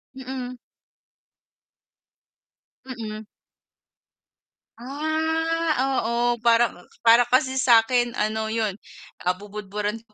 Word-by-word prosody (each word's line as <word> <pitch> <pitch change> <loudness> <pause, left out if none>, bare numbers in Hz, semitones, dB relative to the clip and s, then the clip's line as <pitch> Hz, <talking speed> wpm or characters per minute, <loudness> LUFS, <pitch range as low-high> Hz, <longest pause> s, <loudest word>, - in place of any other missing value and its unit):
Mm. 255 -1 -6 2.3
Mm. 220 -4 -7 1.5
Ah, 320 +4 -1 0.3
oo, 240 +1 +1
parang 230 -5 +2 0.2
para 235 +1 +6
kasi 260 +2 +1
sa'kin 240 -1 +4
ano 220 -1 -1
'yun, 220 -3 -2 0.5
ah, 180 - +3
bubudburan 205 +2 -5
ko 215 - -33
235 Hz, 75 wpm, -24 LUFS, 215-260 Hz, 2.3 s, para